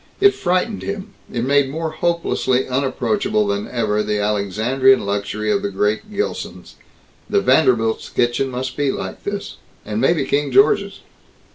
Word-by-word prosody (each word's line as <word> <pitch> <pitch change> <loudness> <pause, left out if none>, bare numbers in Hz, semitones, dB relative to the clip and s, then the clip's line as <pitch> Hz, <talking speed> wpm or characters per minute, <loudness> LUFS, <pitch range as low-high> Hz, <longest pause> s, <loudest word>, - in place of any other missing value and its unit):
It 400 0 +6
frightened 185 +4 -1
him; 200 0 -5 0.2
it 120 - -2
made 140 +1 +3
more 160 +2 -3
hopelessly 160 -6 0
unapproachable 200 +11 0
than 205 +1 -2
ever 110 -3 0
the 105 0 -1
Alexandrian 105 +6 +2
luxury 100 +1 -2
of 200 - +1
the 205 - -2
great 110 - -1
Gilsons.... 205 0 -4 0.6
The 405 - +3
Vanderbilts' 120 - +2
kitchen 120 +3 0
must 130 +1 -4
be 145 -2 +1
like - - -6
this. 200 0 -5 0.3
And 105 +1 -2
maybe 160 +4 +2
King 145 -1 0
George's. 200 +1 +3
135 Hz, 145 wpm, -20 LUFS, -, 0.6 s, It